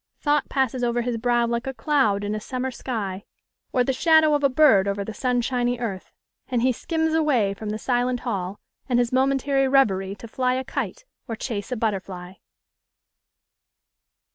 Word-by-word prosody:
Thought 295 0 +1
passes 260 -2 0
over 240 0 +1
his 240 -1 -2
brow 240 0 +2
like 235 +2 -2
a 265 - -4
cloud 250 -10 +1
in 205 +1 -2
a 215 - -2
summer 255 +4 -4
sky, 205 -6 -4 0.5
or 250 - +2
the 265 - 0
shadow 315 +2 +4
of 290 0 +1
a 280 - +5
bird 255 -8 +5
over 200 0 -2
the 220 - -6
sunshiny 245 0 0
earth; 210 -6 -5 0.4
and 245 -2 0
he 255 - +4
skims 320 +5 -1
away 270 -11 +2
from 210 +2 -6
the 215 - -2
silent 245 +1 0
hall 195 -5 -3 0.3
and 245 - +2
his 245 0 +1
momentary 270 +1 +2
reverie 200 -8 +2
to 230 - -10
fly 255 +2 0
a 260 - -2
kite - - -4 0.2
or 230 - -3
chase 220 -1 -5
a - - 0
butterfly! 190 -5 -3
245 Hz, 175 wpm, -24 LUFS, 215-265 Hz, 0.5 s, a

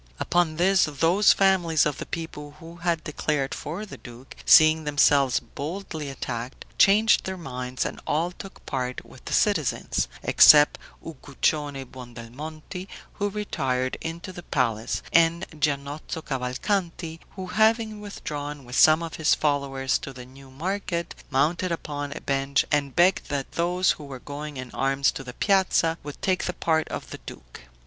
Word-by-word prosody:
Upon 175 -3 +1
this, 185 +3 +4
those 165 +7 +4
families 180 -5 +3
of 150 -2 -2
the - - -6
people 150 -3 -6
who 165 +1 -11
had 170 -1 -1
declared 150 -3 -2
for 175 +8 -5
the 205 - -10
duke, 120 +1 -12
seeing 155 0 +7
themselves 145 -3 +3
boldly 155 +4 -6
attacked, 125 -2 -6
changed 210 +2 +5
their 190 0 -4
minds, 125 -5 -4
and - - -5
all 165 +4 0
took 195 +2 -12
part 130 -1 -3
with 130 - -16
the - - -4
citizens, 155 - +1 0.2
except 150 -1 +7 0.3
Uguccione 145 -2 -2
Buondelmonti, 130 +9 -9 0.3
who 205 0 +1
retired 130 -11 -2
into 170 +3 -6
the 175 - -8
palace, 115 -8 -1
and 170 +1 +4
Giannozzo 145 +1 -3
Cavalcanti, 165 +6 -2 0.2
who 190 -1 -5
having 220 +2 +1
withdrawn 145 -8 -6
with 125 +1 -7
some 155 +5 +6
of 165 - -6
his 155 -1 +3
followers 140 -3 0
to 135 - -7
the 125 -1 -10
new 135 +1 -15
market, 170 +4 -3 0.2
mounted 160 +7 +1
upon 145 -3 -4
a - - -6
bench, 135 0 +1
and 140 -3 0
begged 180 +2 +3
that 140 -2 -3
those 180 +2 +2
who 150 - -6
were 135 -2 -8
going 145 +2 -7
in 130 -1 -7
arms 135 +1 +1
to - - -7
the 125 -1 -8
piazza, 185 -3 +2
would 145 -1 -9
take 185 -1 +1
the 180 - -2
part 160 -2 0
of - - -6
the - - -7
duke. - - -11
150 Hz, 155 wpm, -25 LUFS, 135-175 Hz, 0.3 s, seeing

